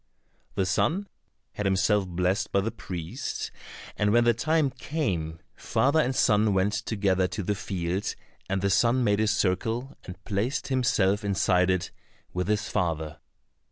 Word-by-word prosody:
The 95 - +1
son 170 - +1 0.4
had 105 - -2
himself 95 +1 +2
blessed 90 +2 0
by 100 - +3
the 115 +3 -2
priest, 85 -3 -5 0.4
and 105 0 +1
when 120 +2 +5
the 120 0 +4
time 155 +4 +1
came, 100 - -3 0.2
father 140 +4 +1
and 130 -3 +1
son 105 -3 +3
went 95 +2 +2
together 100 -3 +1
to 105 - -4
the 105 - 0
field, 95 -1 -3 0.3
and 95 0 -1
the 100 - +2
son 115 +8 +3
made 105 -2 +2
a 110 - +2
circle 110 +5 0
and 90 0 -10
placed 115 +7 -1
himself 105 -6 +2
inside 95 -2 +2
it 95 -2 0 0.4
with 90 0 -2
his 105 0 0
father. 80 -5 -2
100 Hz, 155 wpm, -27 LUFS, 95-115 Hz, 0.4 s, when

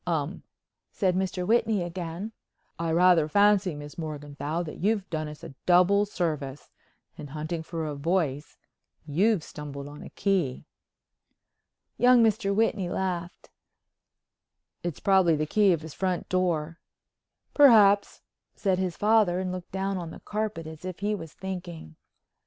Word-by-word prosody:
"Um," 165 0 -2 0.5
said 185 -3 +1
Mr. 185 -1 -1
Whitney 220 -2 +2
again. 175 +3 -5 0.5
"I 165 -1 -1
rather 170 -2 +5
fancy, 200 0 +3
Miss 145 +3 -9
Morganthau, 150 +1 -4
you've 205 0 0
done 155 -1 -2
us 150 0 -10
a - - -9
double 185 +3 +5
service; 150 -8 -3 0.5
in 145 - -7
hunting 155 +3 -4
for 160 0 -5
a 150 - -3
voice, 150 -1 -1 0.5
you've 185 +5 +2
stumbled 140 -2 -8
on 145 +1 -10
a - - -9
key." 180 -11 -1 1.3
Young 245 -1 +6
Mr. 215 -2 +2
Whitney 200 -3 +1
laughed. 180 -2 -4 1.3
"It's 175 -4 -4
probably 190 -4 +4
the 155 0 -1
key 205 +4 +3
of 165 -3 +1
his 160 -2 -9
front 185 +1 -2
door." 170 -3 0 0.7
"Perhaps," 210 -8 +5 0.3
said 190 -3 0
his 185 -3 -2
father, 210 -4 +3
and 185 -1 -2
looked 180 -1 -7
down 195 0 -2
on 170 -2 -6
the - - -10
carpet 210 -6 -3
as 160 +1 -10
if 185 0 -6
he 210 +1 0
was 165 -7 -6
thinking. 175 - -7
180 Hz, 140 wpm, -27 LUFS, 155-195 Hz, 1.3 s, Young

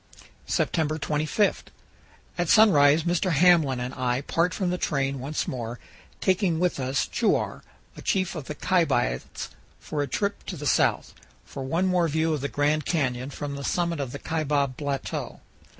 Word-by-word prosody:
September 155 -2 0
25. 155 +7 0 0.7
At 175 -2 -1
sunrise 155 -8 +6
Mr. 175 +1 +1
Hamblin 160 -5 +4
and 125 +1 -4
I 125 0 -1
part 170 +4 0
from 185 -3 -1
the 180 - -2
train 135 -2 -1
once 140 +4 -3
more, 120 -2 -4 0.4
taking 185 -3 +1
with 180 -4 0
us 130 0 0
Chuar, - - 0 0.3
a - - -10
chief 185 -2 0
of 155 -6 -6
the 150 - -6
Kaibabits, 145 - 0 0.3
for 150 -2 -3
a 145 - -1
trip 200 +5 -2
to 185 - -4
the 145 - -6
south, 135 - +2 0.3
for 135 - -8
one 165 +8 0
more 180 -2 +2
view 160 +1 +1
of 150 - -2
the 140 - -1
Grand 150 +1 +1
Canyon 130 -6 -1
from 145 0 -5
the 140 - -6
summit 170 +1 0
of 135 -3 -3
the 140 - -5
Kaibab 145 -4 -1
Plateau. 140 -1 -4
150 Hz, 165 wpm, -26 LUFS, 135-175 Hz, 0.7 s, sunrise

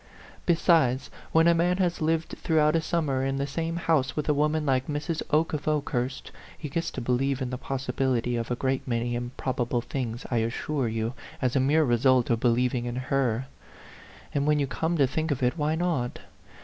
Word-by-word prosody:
Besides, 160 -7 +3 0.2
when 165 +1 +5
a 170 - +6
man 175 +2 +2
has 180 -3 0
lived 160 +1 +1
throughout 155 -1 +3
a 165 - +3
summer 150 -5 0
in 135 0 0
the 140 0 -1
same 165 +4 -3
house 160 -6 +1
with 150 - -2
a 150 - +4
woman 150 +1 +1
like 130 -2 +1
Mrs. 150 +2 -2
Oke 155 +2 +2
of 150 -1 -3
Okehurst, 140 -4 -1 0.3
he 150 - -6
gets 165 +4 -2
to 130 - -4
believe 125 +2 0
in 130 -2 -3
the 125 - -3
possibility 130 -3 -1
of 115 -1 -3
a 125 - 0
great 130 +2 -1
many 120 0 -1
improbable 120 0 -2
things, 120 -1 -4
I 120 - +2
assure 120 +4 -1
you, 110 +1 -2 0.3
as 125 -1 0
a - - +4
mere 145 +5 +3
result 125 -1 +3
of 115 - +2
be 125 - +2
lieving 120 +1 +1
in 120 0 -3
her. 130 -2 0 0.9
And 140 0 0
when 150 0 +4
you 145 - +1
come 160 +5 -1
to 140 - +5
think 155 +5 -2
of 135 -3 -1
it, 125 +3 +2
why 155 -1 0
not? 160 -8 -1
135 Hz, 200 wpm, -27 LUFS, 125-155 Hz, 0.9 s, a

